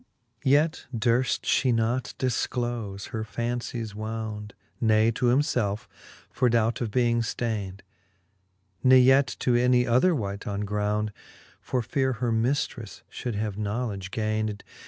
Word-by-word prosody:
XLIV. 115 Hz, -, -40 dB
Yet 150 Hz, +4 st, +3 dB
durft 120 Hz, +3 st, +1 dB, 0.2 s
Ihe 130 Hz, -, +3 dB
not 115 Hz, +2 st, -1 dB
difclole 120 Hz, -5 st, -2 dB
her 110 Hz, -1 st, -3 dB
fancies 120 Hz, -1 st, -3 dB
wound, 110 Hz, -1 st, -5 dB, 0.3 s
Ne 110 Hz, 0 st, +4 dB
to 120 Hz, +2 st, 0 dB
himfelfe, 120 Hz, -4 st, +1 dB, 0.5 s
for 125 Hz, -, +2 dB
doubt 115 Hz, 0 st, +1 dB
of 115 Hz, -, -1 dB
being 120 Hz, +1 st, +2 dB
fdayned, 105 Hz, -4 st, -3 dB, 1.0 s
Ne 130 Hz, 0 st, +7 dB
yet 135 Hz, +2 st, +6 dB
to 125 Hz, -, +2 dB
any 125 Hz, 0 st, +4 dB
other 130 Hz, +9 st, +3 dB
wight 100 Hz, -5 st, -4 dB
on 100 Hz, 0 st, -2 dB
ground, 105 Hz, +1 st, -1 dB, 0.5 s
For 125 Hz, -2 st, -2 dB
feare 130 Hz, +3 st, 0 dB
her 120 Hz, 0 st, -1 dB
miftreffe 120 Hz, -1 st, -1 dB
fhold 120 Hz, -4 st, -4 dB
have 105 Hz, -1 st, -3 dB
knowledge 105 Hz, -2 st, -3 dB
gayned. 110 Hz, 0 st, -2 dB
115 Hz, 135 wpm, -26 LUFS, 105-125 Hz, 1.0 s, Ne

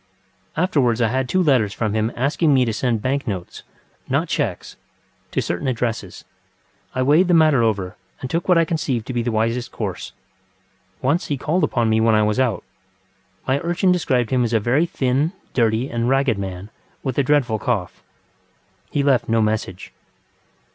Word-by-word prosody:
Afterwards 140 Hz, -10 st, +2 dB
I 115 Hz, -2 st, +2 dB
had 130 Hz, +1 st, -1 dB
two 185 Hz, 0 st, +2 dB
letters 125 Hz, -, +2 dB
from 110 Hz, -3 st, -1 dB
him 110 Hz, +1 st, 0 dB
asking 145 Hz, +3 st, +2 dB
me 130 Hz, -1 st, +3 dB
to 115 Hz, -, -1 dB
send 115 Hz, -2 st, -1 dB
bank 135 Hz, +2 st, -1 dB
notesŌĆönot 95 Hz, -6 st, -5 dB, 1.3 s
chequesŌĆöto -, -, -7 dB
certain 90 Hz, +9 st, -3 dB
addresses. 120 Hz, -2 st, -3 dB, 0.7 s
I 130 Hz, -, +1 dB
weighed 155 Hz, +7 st, +4 dB
the 175 Hz, -, +4 dB
matter 155 Hz, -6 st, +5 dB
over 100 Hz, -5 st, -1 dB, 0.2 s
and 130 Hz, -, -5 dB
took 170 Hz, +7 st, -2 dB
what 180 Hz, -, +5 dB
I 165 Hz, -, +4 dB
conceived 140 Hz, -8 st, -2 dB
to 130 Hz, -, -5 dB
be 120 Hz, -, 0 dB
the 120 Hz, +1 st, -1 dB
wisest 115 Hz, +2 st, -1 dB
course. -, -, -5 dB, 0.9 s
Once 145 Hz, +7 st, +1 dB
he 145 Hz, -, -1 dB
called 155 Hz, +6 st, 0 dB
upon 120 Hz, -6 st, +1 dB
me 110 Hz, 0 st, +2 dB
when 110 Hz, -1 st, +4 dB
I 105 Hz, -, +3 dB
was 105 Hz, +3 st, 0 dB
out. 125 Hz, -5 st, 0 dB, 0.8 s
My 135 Hz, +1 st, +2 dB
urchin 175 Hz, +3 st, +1 dB
described 130 Hz, -9 st, +1 dB
him 125 Hz, -1 st, +2 dB
as 120 Hz, 0 st, -1 dB
a 110 Hz, -, +4 dB
very 130 Hz, +10 st, +1 dB
thin, 140 Hz, +1 st, 0 dB, 0.2 s
dirty, 115 Hz, +1 st, +1 dB
and 120 Hz, -2 st, -1 dB
ragged 135 Hz, -5 st, +2 dB
man, 95 Hz, +1 st, -6 dB, 0.3 s
with 130 Hz, -1 st, -2 dB
a -, -, +3 dB
dreadful 130 Hz, -6 st, +1 dB
cough. 105 Hz, -6 st, -2 dB, 0.9 s
He 145 Hz, -, 0 dB
left 135 Hz, -5 st, +2 dB
no 115 Hz, 0 st, +2 dB
message. 105 Hz, -4 st, -2 dB
125 Hz, 175 wpm, -21 LUFS, 110-145 Hz, 1.3 s, matter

